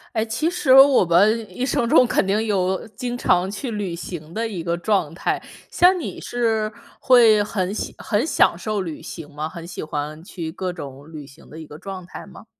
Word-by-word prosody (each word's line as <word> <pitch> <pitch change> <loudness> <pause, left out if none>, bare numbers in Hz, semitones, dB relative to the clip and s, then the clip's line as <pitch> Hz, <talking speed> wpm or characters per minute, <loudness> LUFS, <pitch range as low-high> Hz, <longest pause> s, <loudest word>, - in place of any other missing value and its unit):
哎， 220 - +2
其 230 +8 -2
实 325 -6 0
我 270 -3 +7
们 205 +6 +3
一 250 - -3
生 240 -2 0
中 255 - +6
肯 195 - +1
定 210 +3 +1
有 190 -1 -1
经 240 +4 -5
常 180 -5 +2
去 230 +5 -5
旅 200 -5 -3
行 165 -2 -8
的 225 +5 -2
一 195 -6 -5
个 170 0 -1
状 175 -3 0
态， - - -1 0.3
像 360 +1 +4
你 325 - -6
是 225 -3 -1 0.3
会 230 -5 +6
很 195 -2 -2
享 - - -4
很 210 +7 -1
享 305 - +3
受 210 +4 -3
旅 165 -4 -7
行 165 -4 -8
吗？ 155 +2 -4
很 170 -1 -9
喜 175 - -7
欢 155 +1 -5
去 170 -3 -6
各 185 +2 -4
种 145 -3 -10
旅 150 -3 -8
行 135 - -17
的 160 - -10
一 160 - -9
个 150 0 -12
状 190 -1 -7
态 - - -10
吗？ - - -14
195 Hz, 225 characters per minute, -22 LUFS, 165-225 Hz, 0.3 s, 我